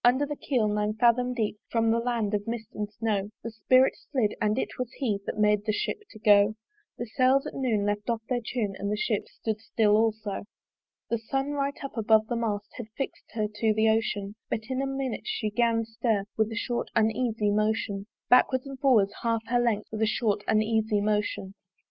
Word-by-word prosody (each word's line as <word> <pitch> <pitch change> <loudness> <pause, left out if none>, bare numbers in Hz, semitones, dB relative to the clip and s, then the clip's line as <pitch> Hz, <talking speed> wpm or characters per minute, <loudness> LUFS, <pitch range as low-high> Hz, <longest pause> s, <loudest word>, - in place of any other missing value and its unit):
Under 260 +4 +4
the 295 +1 -4
keel 250 -7 0
nine 210 0 0
fathom 240 +2 +3
deep 215 -3 -1
From 225 -1 +2
the 230 - +2
land 230 -3 -1
of 205 0 -1
mist 230 -2 -4
and 210 0 -3
snow 210 -2 -1
The 230 - -4
spirit 255 +4 +4 0.2
slid: 240 -7 +1
and 215 +1 +2
it - - -3
was 250 -1 -3
He 220 -8 -1
That - - -3
made 210 -1 +3
the - - +3
Ship 315 - -2
to - - -13
go. 210 0 +5 0.4
The 240 - -3
sails 255 +4 +3
at - - -5
noon 230 -6 0
left 205 +2 -2
off 230 -1 -1
their 245 -2 0
tune 220 -4 -2
And 200 +1 -2
the 210 - 0
Ship 210 -1 -1
stood 220 -1 -4
still 215 -2 +2
also. 220 -2 0 0.7
The 235 - +1
sun 270 +5 -2
right 280 -1 -1
up 275 - -6
above 220 -1 +4
the 240 - -3
mast 210 -3 -2
Had 240 -3 -6
fix'd 275 - -5
her 215 -2 0
to 215 +1 0
the 220 +1 +4
ocean: 215 -2 0 0.2
But 220 - -1
in 260 +1 0
a 275 - -1
minute 270 -3 -3
she 215 - -1
'gan 230 0 +2
stir 225 -2 0
With 220 0 +1
a - - -4
short 240 +1 -2
uneasy 220 -1 +1
motion 210 -1 0 0.2
Backwards 255 +1 +4
and 275 -1 -8
forwards 225 -8 +4
half 230 -1 0
her 245 0 +3
length 230 -4 0
With 220 0 -4
a 220 - +3
short 210 -2 0
uneasy 215 0 +2
motion. 205 -2 -1
220 Hz, 210 wpm, -27 LUFS, 210-240 Hz, 0.7 s, go